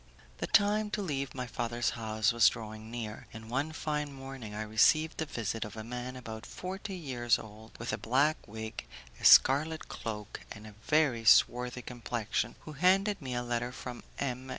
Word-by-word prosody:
The -, -, -2 dB
time 210 Hz, +1 st, +3 dB
to -, -, -2 dB
leave 140 Hz, -7 st, -3 dB
my 125 Hz, -1 st, -3 dB
father's 120 Hz, 0 st, -1 dB
house 110 Hz, -1 st, 0 dB
was 120 Hz, -1 st, +7 dB
drawing 110 Hz, -1 st, -8 dB
near, 115 Hz, -2 st, -6 dB
and 110 Hz, 0 st, -9 dB
one 140 Hz, +5 st, 0 dB
fine 150 Hz, -2 st, -2 dB
morning 135 Hz, -5 st, -8 dB
I 110 Hz, -, -2 dB
received 155 Hz, +9 st, +3 dB
the 160 Hz, -, -1 dB
visit 115 Hz, -3 st, -3 dB
of 105 Hz, -1 st, -8 dB
a 110 Hz, -, -5 dB
man 125 Hz, +2 st, -5 dB
about 110 Hz, -3 st, -7 dB
forty 190 Hz, +1 st, -6 dB
years 125 Hz, -8 st, +1 dB
old, 110 Hz, +1 st, -12 dB
with 120 Hz, -1 st, -4 dB
a 105 Hz, -, -2 dB
black 135 Hz, +8 st, +1 dB
wig, 110 Hz, -, -6 dB, 0.3 s
a -, -, -13 dB
scarlet 155 Hz, +4 st, +6 dB
cloak, 105 Hz, -2 st, -5 dB
and 105 Hz, 0 st, -9 dB
a 105 Hz, -, -10 dB
very 150 Hz, -7 st, +3 dB
swarthy 125 Hz, +3 st, +4 dB
complexion, 120 Hz, -2 st, -2 dB
who 155 Hz, -, -9 dB
handed 190 Hz, +6 st, +3 dB
me 130 Hz, -3 st, -4 dB
a 120 Hz, -, -1 dB
letter 120 Hz, 0 st, -2 dB
from 125 Hz, -1 st, -7 dB, 0.2 s
M. 130 Hz, -1 st, -3 dB
120 Hz, 180 wpm, -31 LUFS, 110-145 Hz, 0.3 s, was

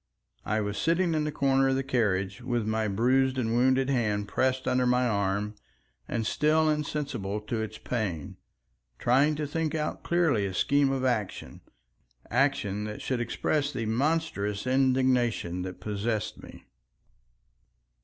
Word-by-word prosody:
I 110 Hz, +1 st, 0 dB
was 105 Hz, 0 st, -3 dB
sitting 170 Hz, +1 st, +2 dB
in 155 Hz, -1 st, 0 dB
the 150 Hz, -, -1 dB
corner 135 Hz, -2 st, +2 dB
of 135 Hz, -, +2 dB
the 135 Hz, -, 0 dB
carriage 105 Hz, -5 st, 0 dB
with 120 Hz, -2 st, -1 dB
my 110 Hz, 0 st, 0 dB
bruised 130 Hz, +6 st, +2 dB
and 115 Hz, -3 st, 0 dB
wounded 130 Hz, +2 st, +3 dB
hand 105 Hz, -6 st, 0 dB
pressed 130 Hz, +4 st, 0 dB
under 125 Hz, 0 st, +2 dB
my 125 Hz, 0 st, +3 dB
arm, 100 Hz, -1 st, 0 dB, 0.5 s
and 115 Hz, -2 st, -2 dB
still 155 Hz, +6 st, +2 dB
insensible 140 Hz, -9 st, -2 dB
to 110 Hz, +1 st, -3 dB
its 110 Hz, 0 st, -5 dB
pain, 100 Hz, -, -3 dB, 0.6 s
trying 140 Hz, +5 st, +3 dB
to 150 Hz, 0 st, -2 dB
think 160 Hz, +2 st, -2 dB
out 155 Hz, -1 st, -2 dB
clearly 160 Hz, -, +1 dB
a 95 Hz, -, -6 dB
scheme 140 Hz, +4 st, +3 dB
of 130 Hz, -1 st, -1 dB
action—action 110 Hz, -6 st, -2 dB, 1.3 s
that 105 Hz, 0 st, -6 dB
should 125 Hz, -2 st, -1 dB
express 140 Hz, +4 st, -1 dB
the 120 Hz, -5 st, -3 dB
monstrous 115 Hz, -5 st, -1 dB
indignation 130 Hz, -8 st, +1 dB
that 90 Hz, 0 st, -6 dB
possessed 105 Hz, +1 st, -3 dB
me. -, -, -13 dB
125 Hz, 145 wpm, -28 LUFS, 105-140 Hz, 1.3 s, wounded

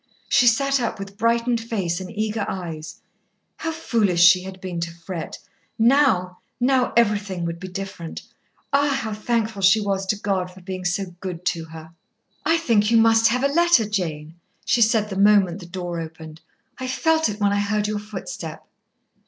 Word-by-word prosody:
She 245 Hz, -2 st, +4 dB
sat 275 Hz, +4 st, +3 dB
up 235 Hz, -2 st, -2 dB
with 195 Hz, 0 st, -8 dB
brightened 230 Hz, +2 st, +1 dB
face 195 Hz, -6 st, -2 dB
and 185 Hz, -, -7 dB
eager 215 Hz, 0 st, -2 dB
eyes. 160 Hz, -4 st, -6 dB, 0.6 s
How 325 Hz, -, -3 dB
foolish 215 Hz, -, +1 dB
she 175 Hz, +1 st, +7 dB
had 190 Hz, 0 st, -9 dB
been 185 Hz, -2 st, -5 dB
to 170 Hz, 0 st, -2 dB
fret. 170 Hz, 0 st, -7 dB, 0.4 s
Now 225 Hz, -7 st, +3 dB, 0.2 s
now 255 Hz, 0 st, +2 dB
everything 205 Hz, -6 st, +1 dB
would 170 Hz, 0 st, -4 dB
be 185 Hz, -, -7 dB
different. 185 Hz, -3 st, -7 dB, 0.5 s
Ah! 285 Hz, +1 st, +3 dB
how 220 Hz, -1 st, -3 dB
thankful 220 Hz, -1 st, -2 dB
she 195 Hz, +3 st, +5 dB
was 195 Hz, -2 st, -2 dB
to 210 Hz, -, +1 dB
God 190 Hz, -3 st, -1 dB
for 185 Hz, +1 st, -15 dB
being 185 Hz, 0 st, -6 dB
so 180 Hz, 0 st, -2 dB
good 180 Hz, -2 st, -6 dB
to 165 Hz, -2 st, -7 dB
her! 160 Hz, 0 st, -12 dB, 0.5 s
"I 330 Hz, -, +3 dB
think 225 Hz, -10 st, +2 dB
you 230 Hz, -, +4 dB
must 225 Hz, 0 st, +5 dB
have 250 Hz, +3 st, 0 dB
a -, -, +5 dB
letter, 340 Hz, -9 st, +4 dB
Jane," 160 Hz, -6 st, -3 dB, 0.3 s
she 240 Hz, -, +2 dB
said 220 Hz, -1 st, +3 dB
the -, -, -3 dB
moment 200 Hz, -3 st, +4 dB
the 175 Hz, -, -10 dB
door 175 Hz, -1 st, -5 dB
opened. 160 Hz, -1 st, -9 dB, 0.4 s
"I 260 Hz, -, -4 dB
felt 320 Hz, +2 st, +1 dB
it 210 Hz, 0 st, -6 dB
when 200 Hz, -1 st, +2 dB
I 205 Hz, -, +1 dB
heard 205 Hz, +1 st, 0 dB
your 210 Hz, 0 st, -2 dB
footstep." 215 Hz, -, -7 dB
205 Hz, 180 wpm, -22 LUFS, 180-230 Hz, 0.6 s, she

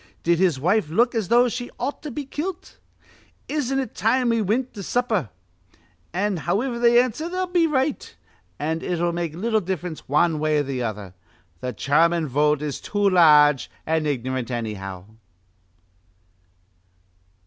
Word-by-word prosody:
Did 170 Hz, 0 st, +2 dB
his 175 Hz, -8 st, +2 dB
wife 180 Hz, +3 st, +1 dB
look 235 Hz, +9 st, +2 dB
as 220 Hz, -5 st, -1 dB
though 240 Hz, +3 st, +5 dB
she 245 Hz, +1 st, -4 dB
ought 285 Hz, -, -3 dB
to 300 Hz, -, -6 dB
be 285 Hz, +2 st, -5 dB
kilt? 335 Hz, +7 st, -6 dB, 0.7 s
Isn't 270 Hz, -3 st, -1 dB
it 265 Hz, -5 st, -3 dB
time 245 Hz, +3 st, +1 dB
we 230 Hz, -1 st, +2 dB
wint 230 Hz, +6 st, -1 dB
to 205 Hz, -, -7 dB
supper?' 220 Hz, -, -1 dB, 0.8 s
An', 195 Hz, +2 st, -1 dB
howiver 220 Hz, -, -1 dB
they 240 Hz, 0 st, +5 dB
answer, 255 Hz, +7 st, -1 dB
they'll 370 Hz, +1 st, -1 dB
be 350 Hz, -2 st, +2 dB
right, 285 Hz, -1 st, -2 dB, 0.4 s
an' 160 Hz, +2 st, -2 dB
it'll 175 Hz, -1 st, -1 dB
make 170 Hz, -2 st, -3 dB
little 220 Hz, +4 st, 0 dB
diff'rence 180 Hz, -5 st, -5 dB
wan 155 Hz, +2 st, +2 dB
way 155 Hz, 0 st, +1 dB
or 145 Hz, -, +2 dB
th' 135 Hz, -2 st, -4 dB
other. 105 Hz, -5 st, -5 dB, 0.5 s
Th' 125 Hz, -4 st, -4 dB
German 165 Hz, +3 st, +2 dB
vote 150 Hz, +2 st, +1 dB
is 145 Hz, -2 st, -4 dB
too 205 Hz, -1 st, +1 dB
large 150 Hz, -5 st, +5 dB, 0.2 s
an' 160 Hz, -1 st, 0 dB
ignorant, 130 Hz, -3 st, -2 dB
annyhow." 100 Hz, -6 st, -5 dB
175 Hz, 150 wpm, -23 LUFS, 150-240 Hz, 0.8 s, though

